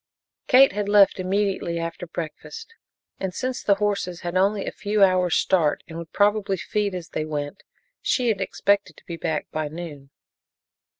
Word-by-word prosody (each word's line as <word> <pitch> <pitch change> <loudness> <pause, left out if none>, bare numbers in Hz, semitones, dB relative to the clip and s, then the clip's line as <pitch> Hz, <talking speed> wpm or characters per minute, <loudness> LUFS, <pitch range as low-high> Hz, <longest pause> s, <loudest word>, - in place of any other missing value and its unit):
Kate 270 0 +7
had 205 +1 -2
left 205 -2 +5
immediately 190 -2 -1
after 165 +1 -5
breakfast, 175 - -7 0.5
and 190 -2 -3
since 255 0 -3
the 200 - +3
horses 200 -4 -2
had 175 +1 -4
only 195 +2 +2
a - - -3
few 205 0 +1
hours' 185 -2 +3
start 165 -6 +2
and 165 - -10
would 165 -1 -9
probably 205 -1 +2
feed 205 +1 -2
as 175 -2 -6
they 155 - -2
went, 150 +3 -4 0.4
she 250 -3 +1
had 205 -3 0
expected 200 +1 0
to - - -18
be 170 - -5
back 160 -2 -2
by 155 -1 -2
noon. 150 -3 -8
190 Hz, 170 wpm, -24 LUFS, 170-205 Hz, 0.5 s, Kate